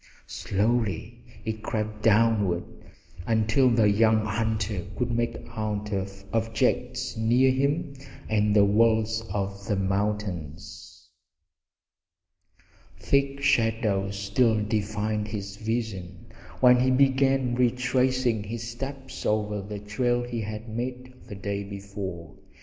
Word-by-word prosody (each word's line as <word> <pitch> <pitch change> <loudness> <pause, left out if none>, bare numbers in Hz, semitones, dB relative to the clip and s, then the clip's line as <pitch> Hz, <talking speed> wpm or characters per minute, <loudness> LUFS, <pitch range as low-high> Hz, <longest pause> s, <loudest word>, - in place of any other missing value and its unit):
Slowly 105 -2 -1 0.2
it 110 -1 -3
crept 110 -1 -3
downward, 105 -5 +3 0.6
until 115 +3 +3
the 115 -3 +4
young 110 +1 +3
hunter 110 -2 -1
could 120 +1 -1
make 120 0 -1 0.2
out 105 -1 -3 0.4
objects 125 +3 0
near 120 +4 +3
him 140 +3 0 0.3
and 105 -1 +2
the 100 -1 +6
walls 110 +1 +3
of 100 -1 -3
the 105 - +1
mountains. 95 -5 -3 1.9
Thick 140 0 +1
shadows 110 -6 +1
still 110 +2 +2
defied 105 0 -1
his 100 -2 -6
vision 105 -5 -4 0.3
when 125 -1 +7
he 130 +1 +3
began 135 -1 +3
retracing 125 -1 +1
his 115 +2 -5
steps 135 +3 -7
over 105 -1 0
the 105 +1 -6
trail 120 +4 0
he 120 -1 -4
had 110 +1 -6
made 125 +3 -5
the 105 - -7
day 100 +1 -3
before. 100 -4 -7
110 Hz, 110 wpm, -26 LUFS, 105-120 Hz, 1.9 s, when